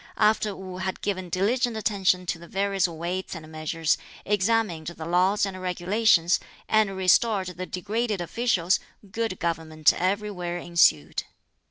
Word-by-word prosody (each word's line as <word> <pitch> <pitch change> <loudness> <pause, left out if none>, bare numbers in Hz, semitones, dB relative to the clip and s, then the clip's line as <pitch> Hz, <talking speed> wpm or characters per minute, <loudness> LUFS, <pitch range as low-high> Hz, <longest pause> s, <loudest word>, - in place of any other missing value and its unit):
After 210 -1 +2
Wu 185 -1 -8
had 185 0 -4
given 185 -3 -2
diligent 225 +6 +1
attention 195 -4 +1
to 165 -1 -2
the 170 - -12
various 195 0 +1
weights 175 +3 -4
and 155 -1 -9
measures, 160 +1 0 0.3
examined 205 -5 +1
the 165 -2 -6
laws 185 +5 +2
and 190 -1 -6
regulations, 180 0 +2 0.3
and 215 -3 +2
restored 190 +1 +3
the 180 +1 -6
degraded 210 +2 -2
officials, 185 -1 +1 0.3
good 225 -2 -2
government 160 -2 +1
everywhere 185 -2 -2
ensued. 170 - +2
185 Hz, 135 wpm, -26 LUFS, 170-210 Hz, 0.3 s, restored